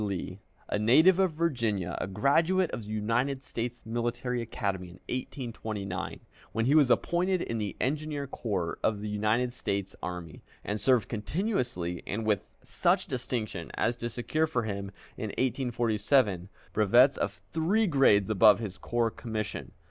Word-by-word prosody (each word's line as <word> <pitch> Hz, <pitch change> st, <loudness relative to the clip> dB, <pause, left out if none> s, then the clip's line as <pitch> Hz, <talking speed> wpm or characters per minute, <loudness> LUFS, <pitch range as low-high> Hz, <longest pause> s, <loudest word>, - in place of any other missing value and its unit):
Lee, 95 Hz, -1 st, -4 dB, 0.3 s
a -, -, -1 dB
native 160 Hz, -, +6 dB
of 190 Hz, -4 st, +3 dB
Virginia, 115 Hz, -, 0 dB
a -, -, -2 dB
graduate 160 Hz, -, +2 dB
of -, -, -4 dB
the 105 Hz, -, -11 dB
United 125 Hz, +6 st, 0 dB
States 120 Hz, -1 st, -4 dB
Military 120 Hz, +2 st, -2 dB
Academy 95 Hz, -6 st, -4 dB
in -, -, -1 dB
1829, 110 Hz, -7 st, -5 dB, 0.3 s
when 115 Hz, +1 st, 0 dB
he 135 Hz, -, +3 dB
was 150 Hz, -4 st, +6 dB
appointed 180 Hz, +8 st, +2 dB
in 115 Hz, -, -3 dB
the 105 Hz, -2 st, -3 dB
Engineer 150 Hz, +1 st, -1 dB
Corps 100 Hz, -10 st, -3 dB
of 105 Hz, -2 st, 0 dB
the 105 Hz, -, -4 dB
United 110 Hz, +4 st, +1 dB
States 100 Hz, -4 st, -3 dB
Army, 90 Hz, -3 st, -6 dB, 0.2 s
and 105 Hz, +1 st, -3 dB
served 125 Hz, -5 st, +3 dB
continuously 110 Hz, -, -2 dB
and 110 Hz, +3 st, -2 dB
with 105 Hz, -2 st, +1 dB, 0.2 s
such -, -, +1 dB
distinction 115 Hz, -8 st, -3 dB
as 115 Hz, +2 st, +1 dB
to 120 Hz, 0 st, -3 dB
secure 155 Hz, +7 st, 0 dB
for 125 Hz, -7 st, -1 dB
him 100 Hz, -2 st, -4 dB, 0.3 s
in 120 Hz, -, -3 dB
1847 120 Hz, -5 st, +1 dB, 0.2 s
brevets 120 Hz, +6 st, +5 dB
of -, -, -2 dB
three 180 Hz, +8 st, +2 dB
grades 130 Hz, -, +4 dB
above 105 Hz, -1 st, +7 dB
his 100 Hz, -5 st, -6 dB
corps 120 Hz, -1 st, 0 dB
commission. 110 Hz, -3 st, -4 dB
115 Hz, 150 wpm, -29 LUFS, 105-135 Hz, 0.3 s, above